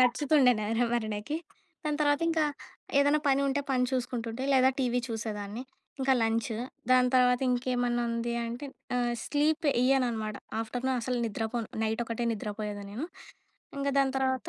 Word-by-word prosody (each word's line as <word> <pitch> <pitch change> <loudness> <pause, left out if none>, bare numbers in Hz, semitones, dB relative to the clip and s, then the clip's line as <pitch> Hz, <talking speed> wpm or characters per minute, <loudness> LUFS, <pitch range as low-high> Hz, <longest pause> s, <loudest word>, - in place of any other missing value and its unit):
నచ్చుతుండే 265 +1 +5
నా 210 - -2 0.3
వరనకి. 220 +3 -2 0.5
దాని 300 -1 0
తర్వాత 290 0 +3
ఇంకా, 320 -2 +2 0.5
ఏదైనా 285 +2 +4
పని 270 0 +4
ఉంటే 280 +1 +1
పని 250 -1 +3
చూసుకుంటుంటే 245 -1 -2
లేదా 260 -1 +6
టీవీ 245 -1 +1
చూసేదాన్ని. 215 -1 -4 0.4
ఇంకా 265 0 +3
లంచు. 225 0 0 0.3
దాని 255 0 +6
తర్వాత 250 -1 +5
ఇంకేమన్నా 245 -1 0
ఉంది 235 0 -1
అంటే 240 +5 -5 0.3
ఆహ్, 240 -1 +1
స్లీప్ 300 +2 +1
వెయ్యను 260 0 +3
అనమాట. 215 -2 -3 0.2
ఆఫ్టర్‌నూన్ 250 +3 -1
అసలు 250 +1 -1
నిద్రపోను, 225 +1 -3 0.2
నైట్ 220 +2 0
ఒకటే 230 +1 -3
నిద్రపోయేదాన్ని. 205 -1 -5
నేను 280 +9 -3 0.7
ఇంగా 280 0 0
దాని 270 -1 +3
తర్వాత 260 -1 0
245 Hz, 145 wpm, -29 LUFS, 225-265 Hz, 0.7 s, లేదా